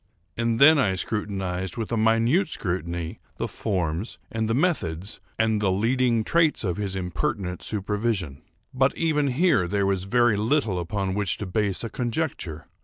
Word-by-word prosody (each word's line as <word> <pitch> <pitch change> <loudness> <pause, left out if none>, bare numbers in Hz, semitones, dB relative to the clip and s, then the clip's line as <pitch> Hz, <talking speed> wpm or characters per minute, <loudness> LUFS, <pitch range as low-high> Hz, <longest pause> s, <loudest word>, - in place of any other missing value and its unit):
And 115 -1 0
then 150 +4 +7
I 100 -7 +2
scrutinized, 95 -3 -3
with 115 -1 -4
a - - +1
minute 115 - +3
scrutiny, 85 - -3 0.2
the - - -2
forms, 90 -1 -2
and 110 -1 -1
the 115 - +2
methods, 100 - -1 0.2
and 110 -1 +1
the 100 -2 +2
leading 115 +3 +2
traits 165 +1 +2
of 90 -4 -1
his 100 -2 -2
impertinent 90 0 -2
supervision. 100 - -2 0.3
But 130 +1 +2
even 150 -3 +1
here 135 - +3
there 100 +2 0
was 95 -1 0
very 120 +1 +3
little 110 -3 +1
upon 95 +2 -2
which 100 0 -1
to 105 - -4
base 100 +1 -1
a 115 - -3
conjecture. 120 - -3
105 Hz, 160 wpm, -25 LUFS, 95-120 Hz, 0.3 s, then